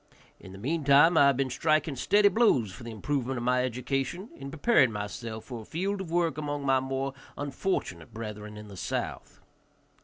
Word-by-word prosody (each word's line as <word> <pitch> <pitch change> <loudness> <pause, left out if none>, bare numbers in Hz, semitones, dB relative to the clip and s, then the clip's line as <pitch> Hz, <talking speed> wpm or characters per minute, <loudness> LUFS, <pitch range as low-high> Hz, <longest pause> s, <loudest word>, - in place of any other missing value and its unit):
In 95 - -12
the 95 - -10
meantime 145 - +4
I 145 -3 +7
have 140 -2 +3
been 135 -2 0
striking 155 0 +1
steady 205 +10 +4
blows 200 - +3
for 120 - -11
the 115 - -7
improvement 130 +3 -2
of 120 - -3
my 125 +1 +2
education, 135 - -2
in 135 0 -8
preparing 145 - +3
myself 110 +2 -5
for 120 -3 -7
a - - -10
field 195 - -2
of 185 - -6
work 165 -3 +1
among 145 -1 -3
my 135 -1 +4
more 135 +1 -2 0.2
unfortunate 140 - -3
brethren 105 -1 -7
in 105 0 -9
the 100 -2 -11
South. - - -4
135 Hz, 185 wpm, -28 LUFS, 115-155 Hz, 0.2 s, I